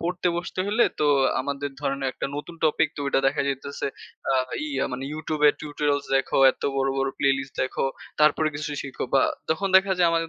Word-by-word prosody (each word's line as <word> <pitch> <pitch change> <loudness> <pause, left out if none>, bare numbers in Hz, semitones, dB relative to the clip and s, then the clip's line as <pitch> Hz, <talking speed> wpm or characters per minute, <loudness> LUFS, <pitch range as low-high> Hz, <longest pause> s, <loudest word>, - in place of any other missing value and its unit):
পড়তে 180 +1 -1
বসতে 175 +1 -4
হলে 215 +4 +3 0.2
তো 150 - +3 0.3
আমাদের 140 +1 -3
ধরেন 140 -1 -1
একটা - - -4
নতুন 165 +3 -6
টপিক 155 0 +3
তো - - -5
ঐটা 135 - +2
দেখা 140 +2 +1
যাইতেছে 140 +1 -3 0.4
আ - - +3 0.3
ইয়া 295 - -1
মানে 130 +2 -4
YouTube 155 -1 -4
এর - - +3
টিউটোরিয়ালস 145 -1 -1
দেখো, 135 - 0
এত - - -17
বড়, 135 0 +1
বড়, 135 0 +1
প্লে 140 - +3
লিস্ট 135 0 -7
দেখো, 130 - -1 0.4
তারপরে 155 +1 +4
কিছু 150 +1 -4 0.2
শিখো 135 -2 -5
বা 135 - +6 0.3
তখন 195 +5 +1
দেখা 190 0 +4
যায় 175 -1 +5
আমাদের 165 0 0
150 Hz, 200 wpm, -25 LUFS, 140-165 Hz, 0.4 s, বা